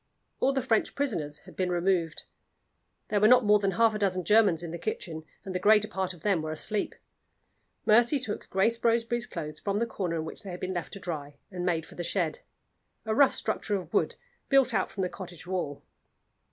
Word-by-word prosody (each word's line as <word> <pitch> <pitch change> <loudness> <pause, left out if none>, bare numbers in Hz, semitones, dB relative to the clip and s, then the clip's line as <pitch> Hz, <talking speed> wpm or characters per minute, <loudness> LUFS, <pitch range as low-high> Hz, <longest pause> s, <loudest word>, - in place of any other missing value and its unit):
All 270 - +3
the 265 -2 -1
French 225 -1 +1
prisoners 160 - -2
had - - -13
been 185 -1 0
removed; 175 -2 0 0.9
there 210 - +2
were 210 - +6
not 250 0 +6
more 210 0 +6
than 195 -1 0
half 225 +3 +4
a 210 - -3
dozen 185 -3 0
Germans 210 -6 +4
in 170 - -5
the 170 - -5
kitchen, 160 -5 -4 0.2
and 190 - -5
the 180 - -1
greater 210 +2 +5
part 190 -2 -2
of 175 -3 -7
them 195 -6 +2
were 155 - -4
asleep. 200 +6 -1 0.9
Mercy 235 +6 +5
took 235 -6 -3
Grace 230 +5 +1
Roseberry's 235 0 +1
clothes 155 -5 -6
from 200 0 -1
the 230 - +1
corner 185 -7 -3
in 160 -1 -2
which - - -7
they 200 - -8
had 180 0 -6
been 185 0 -3
left 175 -2 -4
to 200 - -7
dry, 150 -6 -5 0.2
and 180 -1 -3
made 165 -3 0
for - - -13
the 175 - -5
shed 170 -2 -1 0.7
a 220 - 0
rough 270 +4 +5
structure 215 -1 -1
of 185 -3 -5
wood, - - +1 0.3
built 270 -3 +4
out 195 -3 +1
from 190 - -3
the - - +1
cottage 175 -3 -9
wall. 175 -6 -3
190 Hz, 215 wpm, -28 LUFS, 175-220 Hz, 0.9 s, were